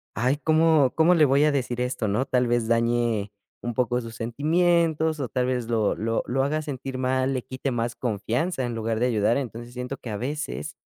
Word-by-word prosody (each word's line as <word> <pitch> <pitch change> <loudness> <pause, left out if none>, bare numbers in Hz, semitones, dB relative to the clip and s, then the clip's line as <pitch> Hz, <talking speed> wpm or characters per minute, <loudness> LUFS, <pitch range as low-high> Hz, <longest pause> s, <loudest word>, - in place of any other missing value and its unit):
"Ay, 130 +6 +1
¿cómo 155 -3 +3
cómo 165 +2 +5
le 155 -3 +5
voy 140 +1 +3
a 150 - +3
decir 125 -3 -2
esto?", 125 -3 -1
¿no?, 105 +6 0
tal 125 -2 +1
vez 120 -1 +1
dañe 115 -3 +1 0.3
un 120 0 -3
poco 125 +1 +1
sus 115 -1 -9
sentimientos 160 +5 +1
o 135 - -2
tal 125 +2 0
vez 125 -2 -1
lo 110 -3 +1
lo 115 +1 -1
lo 135 +2 +1
haga 155 +3 0
sentir 135 -3 -5
mal, 130 +1 0
le 130 -2 -2
quite 130 +1 -4
más 120 0 -2
confianza 125 - -2
en 120 -1 -4
lugar 115 0 -2
de 120 - +2
ayudar. 115 +1 +2
Entonces, 120 -2 -6
siento 125 +2 -5
que, 120 - -9
a 105 - -3
veces, 150 +5 -4
125 Hz, 210 wpm, -25 LUFS, 115-145 Hz, 0.3 s, cómo